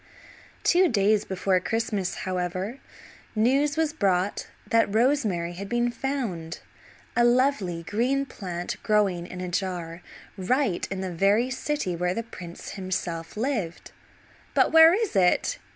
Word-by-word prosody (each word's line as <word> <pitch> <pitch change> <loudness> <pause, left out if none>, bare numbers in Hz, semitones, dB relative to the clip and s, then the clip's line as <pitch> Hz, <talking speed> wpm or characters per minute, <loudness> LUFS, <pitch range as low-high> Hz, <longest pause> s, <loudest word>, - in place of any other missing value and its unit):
Two 365 +1 +5
days 210 -2 +2
before 190 0 +1
Christmas, 210 -2 -2
however, 185 +6 -3 0.6
news 275 +7 +2
was 320 -2 +1
brought 195 - 0 0.2
that 230 -3 +2
rosemary 220 -8 +1
had 195 +3 -7
been 240 0 +1
found, 230 -11 -3 0.6
a 240 - +4
lovely 240 -9 +2
green 250 +9 0
plant 180 -8 -5
growing 195 -5 +1
in 180 0 -7
a 180 - -3
jar, 175 -2 -3 0.4
right 200 0 0
in 195 -1 -4
the 185 -2 -4
very 205 +8 +2
city 260 - -2
where 180 +1 -1
the 230 - -2
prince 175 -6 -9
himself 180 -3 -4
lived. 220 -9 -3 0.6
"But - - +4
where 325 +2 +8
is 435 - -2
it?" 190 - +2
200 Hz, 135 wpm, -26 LUFS, 180-250 Hz, 0.6 s, where